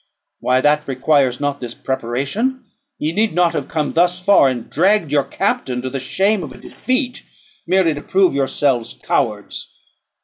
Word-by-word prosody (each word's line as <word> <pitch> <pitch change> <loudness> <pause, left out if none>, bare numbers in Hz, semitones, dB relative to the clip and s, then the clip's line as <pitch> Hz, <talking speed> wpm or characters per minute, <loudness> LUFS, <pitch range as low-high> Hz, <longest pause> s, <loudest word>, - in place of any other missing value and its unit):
Why, 130 +1 +2
that 150 +1 +2
requires 135 -1 +1
not 145 -1 -2
this 120 -1 -6
preparation; 140 - -2 0.3
ye 155 - -1
need 215 +1 +1
not 175 -1 +3
have 140 - -3
come 155 -3 -2
thus 175 +2 +2
far, 180 -7 +5
and 120 -3 -4
dragged 185 -1 +2
your 145 -2 +3
captain 125 -1 -1
to 130 - -4
the 135 - -3
shame 195 +10 +1
of 155 - -7
a - - -11
defeat, 255 -1 -2 0.5
merely 185 -4 +3
to 145 - -6
prove 190 0 +2
yourselves 135 -3 0
cowards. - - -2
150 Hz, 165 wpm, -19 LUFS, 130-190 Hz, 0.5 s, far